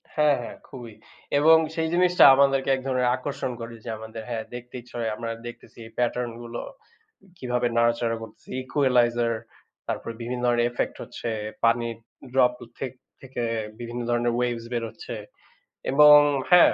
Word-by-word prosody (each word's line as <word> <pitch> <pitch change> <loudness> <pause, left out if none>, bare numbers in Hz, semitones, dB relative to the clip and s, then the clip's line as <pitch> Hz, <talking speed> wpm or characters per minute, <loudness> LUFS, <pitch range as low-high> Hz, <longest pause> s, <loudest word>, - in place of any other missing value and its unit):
হ্যাঁ, 150 -2 +4
হ্যাঁ 120 - -8
খুবই। 120 -5 -10 0.5
এবং 160 +2 +7 0.2
সেই 160 -1 0
জিনিসটা 180 0 +4
আমাদেরকে 135 0 +3
এক 130 - -1
ধরনের 125 -2 +2
আকর্ষণ 130 0 -4
করে 115 0 -7
যে - - -5
আমাদের 110 +1 -8
হ্যাঁ, 115 -2 -3
দেখতে 120 0 -10
ইচ্ছা 120 - -17
হয়। 110 -2 -1
আমরা 115 +1 -5 0.2
দেখতেছি 120 - -12
এই 115 - -13
pattern 125 0 0
গুলো 120 0 -6 0.8
কিভাবে 125 -3 0
নাড়াচাড়া 115 0 +2
করতেছি। 110 -1 -12
equalizer 120 -3 +2 0.6
তারপরে 115 - -4
বিভিন্ন 125 +1 -3 0.2
ইফেক্ট 120 - -2
হচ্ছে। 120 - -6 0.3
পানির 115 0 +2 0.4
ড্রপ 125 -2 +4 0.3
থেক 130 - -3 0.3
থেকে 130 -2 -5 0.4
বিভিন্ন 120 0 -5
ধরনের 120 0 +1
ওয়েভস 120 -1 -1
বেরোচ্ছে। 115 -1 -5 0.8
এবং 150 +2 +9 0.4
হ্যাঁ, 180 -1 +8
120 Hz, 145 wpm, -25 LUFS, 115-130 Hz, 0.8 s, এবং